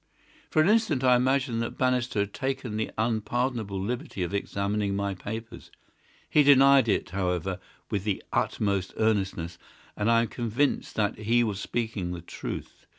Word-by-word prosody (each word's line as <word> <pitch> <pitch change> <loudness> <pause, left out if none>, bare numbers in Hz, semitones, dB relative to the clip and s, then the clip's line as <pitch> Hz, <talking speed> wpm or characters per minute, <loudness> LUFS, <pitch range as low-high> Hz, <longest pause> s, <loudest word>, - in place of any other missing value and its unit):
"For 155 - +4
an - - +2
instant 210 - +2
I 125 -1 +6
imagined 125 -1 +1
that 115 - -4
Bannister 125 -4 +1
had 100 0 -3
taken 130 -4 -3
the 110 0 -1
unpardonable 110 -1 -1
liberty 120 - -3
of 90 - -4
examining 100 0 -1
my 100 0 -1
papers. 110 +4 -7 0.6
He 150 - +4
denied 140 -2 +6
it, 105 - 0
however, 90 -1 -1 0.3
with 100 -3 -1
the 105 -2 -2
utmost 100 -3 0
earnestness, 95 -6 0 0.4
and 105 +2 0
I 115 0 +5
am - - -2
convinced 120 +4 -1
that 105 -1 0
he 115 +3 +3
was 105 -4 -2
speaking 105 -6 -3
the 85 - -6
truth. 85 - -7
110 Hz, 155 wpm, -27 LUFS, 100-125 Hz, 0.6 s, I